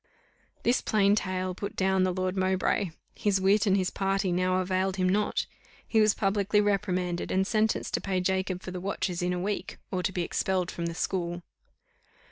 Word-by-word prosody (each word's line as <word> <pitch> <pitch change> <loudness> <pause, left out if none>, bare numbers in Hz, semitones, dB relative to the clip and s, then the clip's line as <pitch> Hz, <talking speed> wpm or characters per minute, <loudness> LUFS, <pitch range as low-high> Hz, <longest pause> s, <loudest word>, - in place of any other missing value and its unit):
This 245 - +3
plain 200 -2 +3
tale 185 -2 -1
put 200 +3 -6
down 190 0 +2
the 185 - +1
Lord 185 +1 -1
Mowbray. 190 +1 +1 0.2
His 200 -2 +1
wit 200 +3 +3
and 195 0 +4
his 185 -1 0
party 195 -1 0
now 185 +1 +1
availed 185 +1 0
him 185 -1 +1
not; 205 +3 +1 0.4
he 220 - +3
was 215 -1 +4
publicly 200 +1 +1
reprimanded, 185 -4 0
and 190 +1 +2
sentenced 220 +1 0
to - - 0
pay 190 -2 -1
Jacob 185 0 -1
for 185 - -6
the 180 -1 -5
watches 185 -2 -2
in 180 0 0
a 180 - -1
week, 200 +3 -3
or 185 - -1
to 180 - -1
be 180 -2 -1
expelled 185 +1 -1
from 170 -1 -3
the 170 - -5
school. 175 -1 -2
190 Hz, 190 wpm, -28 LUFS, 185-200 Hz, 0.4 s, and